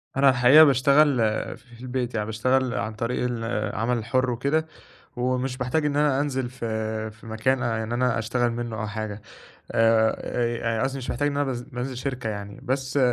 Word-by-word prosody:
أنا 135 0 +5
الحقيقة 130 +4 +7
باشتغل 140 0 +4 0.4
ف - - -22
في 115 - -15
البيت 125 -1 -3
يعني، 105 -2 -1
باشتغل 125 +4 +1
عن 110 - -2
طريق 115 +3 -2
العمل 115 0 -1
الحُر 125 +3 0
وكده 140 +7 0 0.5
ومش 125 +1 -1
باحتاج 130 +5 0
إن 145 -1 -1
أنا 145 -2 +2
أنزِل 130 -4 -1
في 110 -3 -3
في 110 +1 -16
مكان 125 +4 0
آآ 115 -2 -1
إن 115 - -5
أنا 125 -1 +1
أشتغل 120 +2 0
منُّه 115 -1 -4
أو 110 - -2
حاجة 105 -1 -5 0.5
آآ 115 0 +3 0.6
آآ، - - +1
قصدي 135 0 -1
مش 125 - -5
محتاج 145 +4 0
إن 140 - -3
أنا 145 - +2
باز 125 -3 -3
بانزِل 125 +1 -5
شركة 125 -3 -3
يعني 100 -1 -7
بس، 130 +1 -1
125 Hz, 185 wpm, -25 LUFS, 110-130 Hz, 0.6 s, الحقيقة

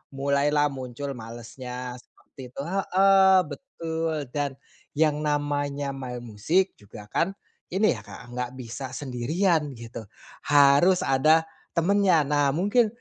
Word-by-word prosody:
mulailah 140 +1 +2
muncul 130 +1 -6
malesnya 125 +1 -7
seperti 130 - -17
itu 130 - -7
heeh, 190 +2 +4 0.2
betul, 165 - -4 0.2
dan 145 -2 -2 0.4
yang 150 -1 +2
namanya 145 -1 -1
main 125 -3 -6
musik 135 - +1
juga, 105 0 -12
kan, 190 +3 0 0.4
ini, 215 +3 +4
ya, - - -3
Kak, 120 +1 -11
nggak 125 0 -3
bisa 125 +1 -6
sendirian 150 +4 0
gitu 115 0 -8 0.5
harus 145 +6 +5
ada 155 +5 +4 0.3
temennya 180 -1 +3
nah 145 0 +1
mungkin, 205 +6 +3
145 Hz, 120 wpm, -26 LUFS, 125-165 Hz, 0.5 s, harus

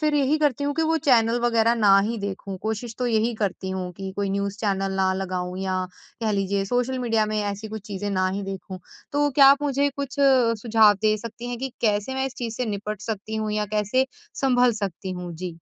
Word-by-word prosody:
फिर 305 -1 +1
यही 290 +2 +2
करती 285 -2 +1
हूँ 285 - -1
कि 320 - +1
वो 325 +1 +2
चैनल 235 -3 +4
वगैरह 230 -1 +3
ना 205 -4 +5
ही 235 - -2
देखूँ 200 -1 -5
कोशिश 220 +2 -3
तो 250 - 0
यही 230 0 +1
करती 190 -1 -2
हूँ 185 -1 -3
कि 195 -1 -5
कोई 200 -1 -1
न्यूज़ 200 0 -2
चैनल 195 -2 0
ना 190 0 +2
लगाऊँ 185 -1 -3
या 185 -1 -1 0.4
कह 220 - +1
लीजिए 195 0 0
सोशल 245 +5 0
मीडिया 225 -3 +1
में 215 0 -1
ऐसी 205 +1 -4
कुछ 215 -1 -7
चीज़ें 205 0 -4
ना 185 -1 +1
ही 195 +2 -3
देखूँ। 195 -1 -6 0.3
तो 290 0 +2
क्या 275 0 +6
आप 280 +1 +3
मुझे 285 0 +1
कुछ 280 -1 -4
सुझाव 230 -5 +4
दे 215 0 +3
सकती 230 +2 -7
हैं 245 - -4
कि 265 0 -4
कैसे 210 +3 +1
मैं 265 0 0
इस 265 - -7
चीज़ 230 -2 -3
से 250 - -1
निपट 210 -1 -4
सकती 215 0 -4
हूँ 215 -1 -2
या 210 0 0
कैसे 235 +6 +2 0.3
सँभल 250 -2 +4
सकती 190 0 -4
हूँ? 180 -1 -6
जी। 170 0 -6
215 Hz, 220 wpm, -24 LUFS, 195-250 Hz, 0.4 s, क्या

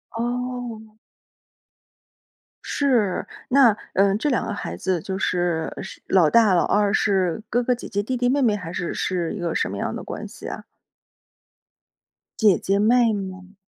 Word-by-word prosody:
哦。 240 -2 -4 1.7
是， 240 -10 +1 0.2
那， 250 -5 +6 0.2
呃， 195 0 +3
这 295 +6 0
2 250 - 0
个 215 - -3
孩 - - -5
子 185 -2 -1
就 190 +2 -4
是 175 -3 0
是 190 - -9
老 175 -5 +4
大 220 -5 +5
老 175 - +3
二 205 -1 +2
是 195 -2 +1
哥 245 +2 +1
哥 250 - +2
姐 245 - -7
姐 205 -1 -2
弟 255 +4 -2
弟 245 0 +1
妹 280 +2 +2
妹 220 -4 +3
还 175 -5 -6
是 175 -2 -3
是 175 -1 -2
一 210 - -6
个 170 -2 -2
什 - - 0
么 - - -5
样 - - -3
的 - - -6
关 - - -6
系 - - -10
啊？ - - -6 1.8
姐 205 -6 +5
姐 195 +1 0
妹 230 +1 +4
妹。 190 -1 -7
205 Hz, 175 characters per minute, -23 LUFS, 185-240 Hz, 1.8 s, 那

